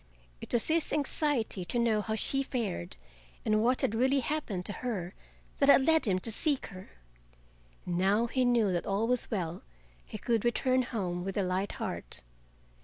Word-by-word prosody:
It - - -9
was 235 - +1
his 325 0 +1
anxiety 285 - 0
to 240 - -1
know 230 -3 +2
how 220 +1 -2
she 270 +5 0
fared 225 - -3 0.5
and 215 0 +3
what 250 +3 +2
had - - +1
really 265 +4 +2
happened 240 -11 -3
to 205 - -1
her 200 -8 -3 0.5
that 280 - +4
had 270 -1 +7
led 320 -1 +4
him 185 -2 +2
to 225 +5 -1
seek 285 +4 0
her. 185 0 -10 1.0
Now 190 +6 +2
he 255 +2 0
knew 235 -5 +3
that 175 -1 -2
all 200 +3 +1
was 250 0 0
well 175 -5 -3 0.4
he - - -8
could 230 0 0
return 255 +2 +2
home 185 -8 -3
with 195 +1 -4
a 200 - +2
light 185 +2 -1
heart. - - -6
225 Hz, 180 wpm, -30 LUFS, 190-255 Hz, 1.0 s, had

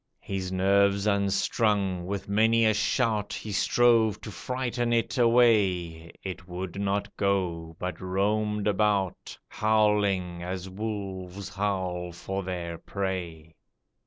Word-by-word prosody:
His 95 -2 -3
nerves 100 +1 +3
unstrung, 100 -2 +1
with 100 0 -4
many 110 +3 +3
a 110 - +4
shout 110 -1 0
He 110 - -5
strove 115 +1 +3
to 110 - -7
frighten 120 0 -2
it 115 +1 0
away, 95 -9 +3
It 95 -1 -6
would 90 +2 -5
not 100 +1 -1
go, 90 -5 -1
but 90 0 -5
roamed 105 +3 0
about, 100 -2 0
Howling, 105 -5 +1
as 90 +1 -4
wolves 95 -2 -5
howl 95 -3 -2
for 95 +3 -4
their 85 -3 -5
prey. 85 -5 -4
100 Hz, 115 wpm, -27 LUFS, 90-105 Hz, -, a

